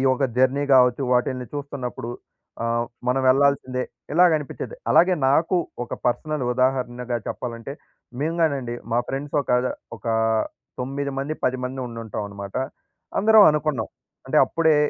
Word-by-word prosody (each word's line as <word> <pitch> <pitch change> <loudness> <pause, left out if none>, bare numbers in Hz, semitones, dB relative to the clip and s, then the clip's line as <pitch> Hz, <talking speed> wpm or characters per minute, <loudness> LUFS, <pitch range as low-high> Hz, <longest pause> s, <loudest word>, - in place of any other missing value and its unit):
యొక్క 130 +1 +3
జర్నీ 130 +3 +3
కావచ్చు, 125 +1 +5
వాటిల్ని 125 0 0
చూస్తున్నప్పుడు. 135 -4 -5 0.5
ఆహ్, 115 0 +1 0.2
మనం 130 +1 +2
వెళ్ళాల్సిందే 130 -1 +2 0.3
ఇలాగనిపించేది. 165 - +2 0.2
అలాగే 180 +2 +5
నాకు 165 +6 +3 0.3
ఒక - - -5
పర్సనల్ 150 +3 -1
ఉదాహరణగా 125 -1 0
చెప్పాలంటే, 115 +1 -5 0.5
మేము 160 +3 -1
గానండి 135 -7 0 0.2
మా 120 - +3
ఫ్రెండ్స్ 140 +2 -4
ఒక - - -6 0.5
ఒక - - -14 0.7
తొమ్మిది 140 +2 -3
మంది, 145 +3 -2
10 130 0 +1
మంది 130 +1 -4
ఉండుంటామన్నమాట. 105 -4 -6 0.6
అందరం 215 0 +7
అనుకున్నాం. 150 -7 -1 0.4
అంటే - - 0
అప్పుడే 160 -2 +2
130 Hz, 120 wpm, -23 LUFS, 125-145 Hz, 0.7 s, అందరం